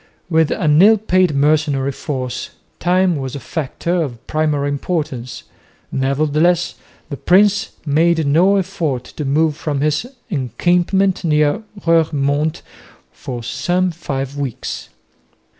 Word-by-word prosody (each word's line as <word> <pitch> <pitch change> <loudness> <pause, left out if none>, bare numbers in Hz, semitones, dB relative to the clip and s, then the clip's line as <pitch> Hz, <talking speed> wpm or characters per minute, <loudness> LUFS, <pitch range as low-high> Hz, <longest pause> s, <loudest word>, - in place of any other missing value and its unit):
With 160 -1 +3
an 150 -1 +3
ill 220 +3 +7
paid 185 -6 +2
mercenary 145 -1 +2
force 130 -3 -4 0.3
time 180 0 +2
was 135 -1 -5
a - - -4
factor 165 +5 -2
of 120 -7 -5
primary 150 -2 0
importance, 140 -4 -3 0.5
nevertheless 155 +6 +1 0.4
the 140 - -4
prince 200 +5 +3 0.2
made 160 +2 +2
no 170 +8 +4
effort 175 -9 -1
to 150 - -7
move 150 +2 +2
from 150 -3 -3
his 150 +9 0 0.2
encampment 175 - +1
near 150 +2 +2 0.2
Roeremonde 155 -2 +1 0.5
for 120 -2 -7
some 180 +8 0
five 140 -4 -4
weeks. 140 -5 -5
155 Hz, 115 wpm, -18 LUFS, 140-175 Hz, 0.5 s, ill